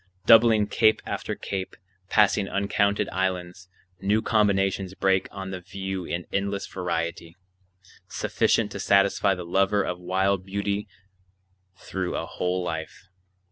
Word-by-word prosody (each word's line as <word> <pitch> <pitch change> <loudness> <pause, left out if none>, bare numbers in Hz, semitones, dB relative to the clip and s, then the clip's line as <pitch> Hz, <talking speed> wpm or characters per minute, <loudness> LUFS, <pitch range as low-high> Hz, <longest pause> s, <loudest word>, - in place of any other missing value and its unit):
Doubling 115 -2 +6
cape 110 +1 +3
after - - -4
cape, 95 -1 -5 0.3
passing 100 -2 +3
uncounted 100 +1 +1
islands, 90 -1 -3 0.3
new 100 +3 +2
combinations 95 -3 +1
break 95 -1 +1
on 95 -1 -7
the 95 - -5
view 95 0 -5
in 85 +1 -4
endless 100 0 -1
variety, 85 -2 -4 0.7
sufficient - - 0
to - - -6
satisfy 100 0 +3
the 90 -1 -7
lover 95 +3 +2
of 90 0 -4
wild 95 +1 0
beauty 100 +2 -2 0.9
through 95 -2 -4
a - - -3
whole 90 0 -2
life. 80 +2 -6
95 Hz, 125 wpm, -25 LUFS, 90-100 Hz, 0.9 s, Doubling